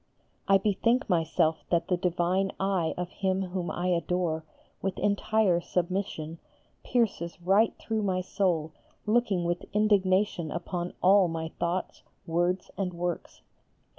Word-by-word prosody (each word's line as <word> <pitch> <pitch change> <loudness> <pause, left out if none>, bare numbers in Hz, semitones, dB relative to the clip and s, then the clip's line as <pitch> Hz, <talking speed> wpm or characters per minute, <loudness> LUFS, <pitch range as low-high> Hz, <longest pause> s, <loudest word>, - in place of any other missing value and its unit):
I 195 0 +6
bethink 225 +5 +1
myself 165 -1 +1
that 170 -1 +1
the 180 - +2
divine 180 +2 0
eye 190 -4 0
of 180 0 -4
Him 190 -1 0
whom 180 -1 -3
I 180 +1 -1
adore, 170 -2 0 0.4
with 195 -1 -2
entire 205 -3 +2
submission, 175 -3 -2 0.4
pierces 200 -8 0
right 195 +6 +3
through 220 -1 -2
my 185 -3 0
soul 175 -4 0 0.3
looking 210 -5 +2
with 175 +1 -1
indignation 200 -4 +2
upon 175 0 -4
all 190 0 +6
my 165 -1 -3
thoughts, 175 +2 -2 0.2
words 175 +2 0
and 180 -3 -2
works. 175 0 -4
180 Hz, 130 wpm, -28 LUFS, 170-195 Hz, 0.4 s, I